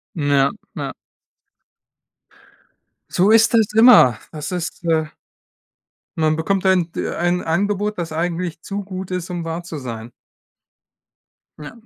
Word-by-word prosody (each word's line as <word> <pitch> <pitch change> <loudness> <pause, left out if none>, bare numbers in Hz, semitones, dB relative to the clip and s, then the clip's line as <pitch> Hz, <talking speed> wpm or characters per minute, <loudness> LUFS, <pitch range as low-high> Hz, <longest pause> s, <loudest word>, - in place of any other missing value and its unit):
Ja, 145 -3 +2 0.2
ja. - - -4 2.2
So 190 +4 +3
ist 225 +1 +5
es 220 -3 +3
immer. 220 - +7
Das 150 +1 -6
ist 175 -1 -5
äh 160 -2 +1 1.1
Man 155 -1 +1
bekommt 190 +4 -1
ein 180 -3 +2
d - - -3
ein 175 +1 0
Angebot, 205 +5 -1
das 170 -2 -4
eigentlich 170 +1 -3
zu 200 0 -4
gut 190 -1 -7
ist, 180 -1 -4
um 175 -2 -4
wahr 165 +1 -4
zu 170 -3 -7
sein. 115 -3 -7 1.5
Ja. 150 -1 -9
175 Hz, 125 wpm, -20 LUFS, 155-190 Hz, 2.2 s, immer